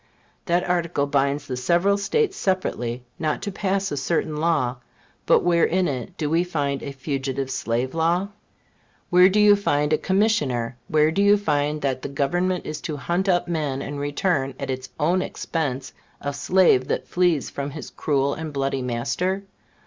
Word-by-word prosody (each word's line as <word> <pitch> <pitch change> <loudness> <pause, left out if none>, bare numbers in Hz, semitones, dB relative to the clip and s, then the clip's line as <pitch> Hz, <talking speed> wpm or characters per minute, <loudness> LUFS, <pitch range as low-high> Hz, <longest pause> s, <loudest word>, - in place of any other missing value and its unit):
That 175 +1 +1
article 170 -5 0
binds 140 0 0
the 130 - -4
several 175 +10 +2
States 390 - 0
separately 125 - -1 0.2
not 155 -2 -1
to 205 - -3
pass 195 0 -1
a 145 - -2
certain 155 +2 -1
law, 150 -6 +1 0.5
but - - +5
where 170 -1 +3
in 185 0 +2
it 130 -5 -5
do 150 - -1
we 165 +3 +2
find 145 -6 -2
a 140 - -5
Fugitive 135 -1 -3
Slave 120 +1 -1
Law? 170 +4 +1 0.8
Where 180 +1 +7
do 205 +2 +2
you 210 0 +7
find 150 -6 +1
a 155 - +2
Commissioner? 150 - +1
Where 155 0 +3
do 195 - +1
you 205 +1 +6
find 150 -5 0
that 130 -2 -1
the - - -5
Government 175 +7 0
is 155 0 -5
to 155 -3 -4
hunt 175 +7 -1
up 175 -1 +2
and 145 -3 -3
return, 145 -1 0
at - - -3
its 130 0 -5
own 175 +5 +2
expense, 135 -8 -3 0.3
a 145 0 -3
slave 145 -3 +3
that - - -2
flees 175 -5 +1
from 140 0 -4
his 150 +2 -8
cruel 140 -1 0
and 160 -1 -5
bloody 135 -1 -1
master? 125 +11 -1
150 Hz, 170 wpm, -23 LUFS, 135-180 Hz, 0.8 s, Where